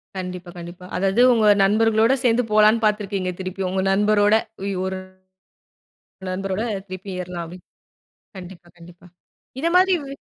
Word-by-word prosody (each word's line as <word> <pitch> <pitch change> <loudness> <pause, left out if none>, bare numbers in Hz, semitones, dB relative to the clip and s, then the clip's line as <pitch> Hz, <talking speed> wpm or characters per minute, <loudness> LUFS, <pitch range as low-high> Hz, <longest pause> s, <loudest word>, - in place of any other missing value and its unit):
கண்டிப்பா, 180 -1 -6
கண்டிப்பா. 175 +1 -10
அதாது 195 +5 +1
உங்க 220 -2 +2 0.2
நண்பர்களோட 225 +4 +3
சேர்ந்து 245 0 +2
போலாம்ன்னு 215 +1 +4
பார்த்திருக்கீங்க. 200 -3 -1
திருப்பி 190 +1 -5
உங்க 190 0 -1
நண்பரோட, 205 +1 +3 0.3
உய் 200 -1 -2
ஒரு 190 0 -4 1.3
நண்பரோட 195 +2 -3 0.3
திருப்பி 185 +1 -8
ஏறலாமே. 175 0 -7 0.8
கண்டிப்பா 175 -1 -11
கண்டிப்பா. 175 +1 -16 0.5
இத 335 - +1
மாதிரி 375 0 +4
வே 275 - -7
195 Hz, 125 wpm, -22 LUFS, 180-215 Hz, 1.3 s, போலாம்ன்னு